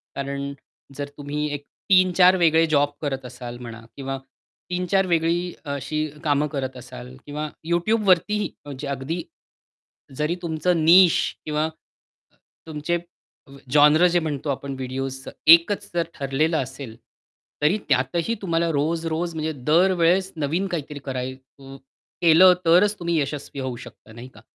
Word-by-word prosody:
कारण 140 0 -4 0.4
जर 145 0 -3
तुम्ही 145 +1 -3
एक 145 -1 -5 0.3
3-4 185 -1 +5
वेगळे 165 -2 +4
जॉब 145 -2 +2
करत 135 -3 -3
असाल 125 -1 -8
म्हणा 115 -2 -9
किंवा 135 -1 -4 0.5
3-4 180 +2 +1
वेगळी 170 +1 0
अशी 140 +2 -3 0.2
कामं 145 -1 +1
करत 130 -2 -3
असाल 65 - -10
किंवा 150 +1 -4 0.2
YouTubeवरतीही 210 +2 +2 0.2
म्हणजे 140 0 -7
अगदी 140 +5 -3 1.0
जरी 155 +3 0
तुमचं 165 0 0
निश 175 +1 +7 0.3
किंवा 155 0 0 1.0
तुमचे 155 +2 -2 0.5
अ, - - -17 0.2
जोनरं 150 +4 +6
जे 175 - +4
म्हणतो 150 -3 -4
आपण 140 0 -3
व्हिडिओसचं, 135 +1 -5 0.2
एकच 195 +5 +6
जर 170 -1 0
ठरलेलं 145 +4 0
असेल, 130 -3 -5 0.7
तरी 155 +8 +3
त्यातही 155 - +1
तुम्हाला 170 -3 0
रोज-रोज 165 +3 -1
म्हणजे 160 0 -2 0.2
दरवेळेस 180 +2 +3
नवीन 160 +6 -1
काहीतरी 150 -5 -5
कराय 130 -1 -3
अ, 135 +1 -15 0.5
केलं 175 +2 +7
तरच 185 +5 +4
तुम्ही 170 -2 0
यशस्वी 140 0 -4
होऊ 130 -2 -3
शकता, - - -15
नाही 120 +2 -10
का? - - -16
155 Hz, 130 wpm, -23 LUFS, 135-170 Hz, 1.0 s, निश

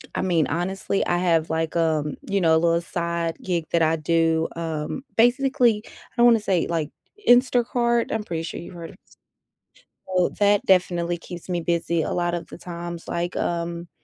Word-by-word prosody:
I - - 0
mean, 170 -5 +2
honestly, 190 +4 -1
I 175 - +1
have, 165 -3 +1
like, 160 0 -1
um, 155 -3 +1
you 200 0 +1
know, 165 -2 +4
a - - +5
little 170 0 +2
side 170 -1 -3
gig 175 -3 -1
that 170 - +2
I 160 0 +3
do. 165 0 +1
Um, 160 - -4
basically, 245 -2 +3
I - - -14 0.3
don't 240 - +5
wanna 230 -2 +5
say, 190 -5 0
like, 160 -3 -1 0.4
Instacart. 245 -1 +3
I'm 220 -1 -1
pretty 165 -5 -4
sure 165 - -6
you've 170 - -10
heard 165 -1 -8
of - - -16
s - - -23 0.9
Well, 185 -2 +1
that 205 0 +3
definitely 175 -2 +2
keeps 175 +1 -10
me 175 -1 -1
busy 170 0 0
a - - -2
lot 175 0 0
of 170 - -4
the - - -10
times, 170 -1 -7
like, 175 +1 -2
um, 170 0 -2
170 Hz, 190 wpm, -24 LUFS, 165-190 Hz, 0.9 s, a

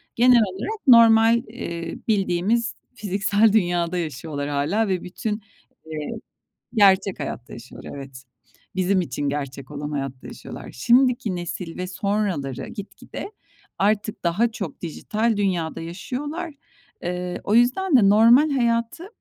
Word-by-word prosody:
genel 245 0 +6
olarak 215 - -4
normal, 230 -1 +7
eee, 170 -8 -6
bildiğimiz, 210 +2 +1 0.2
fiziksel 205 0 +2
dünyada 175 -4 +1
yaşıyorlar 150 -2 -4
hâlâ 145 +10 0
ve 185 -2 -1
bütün, 210 +4 -4 0.4
eee 155 -2 -5 0.6
Gerçek 195 -3 +4
hayatta 120 - -6
yaşıyorlar, 120 +2 -10
evet. 135 -2 -9 0.5
Bizim 185 0 +2
için 145 -2 -3
gerçek 140 -1 -5
olan 145 0 -5
hayatta 135 -3 -5
yaşıyorlar. - - -9
Şimdiki 240 - +2
nesil 175 -1 -5
ve 185 - -3
sonraları 185 - -2
gitgide 210 - -8 0.5
artık 210 +1 0
daha 200 +8 +1
çok 195 -8 -6
dijital 215 +6 -1
dünyada 180 -6 -1
yaşıyorlar. 290 - -5 0.5
Iıı, 180 0 -3
o 210 - +1
yüzden 270 +9 +3
de 210 -6 +6
normal 230 +8 +6
hayatı 235 +5 0
195 Hz, 120 wpm, -23 LUFS, 165-230 Hz, 0.6 s, normal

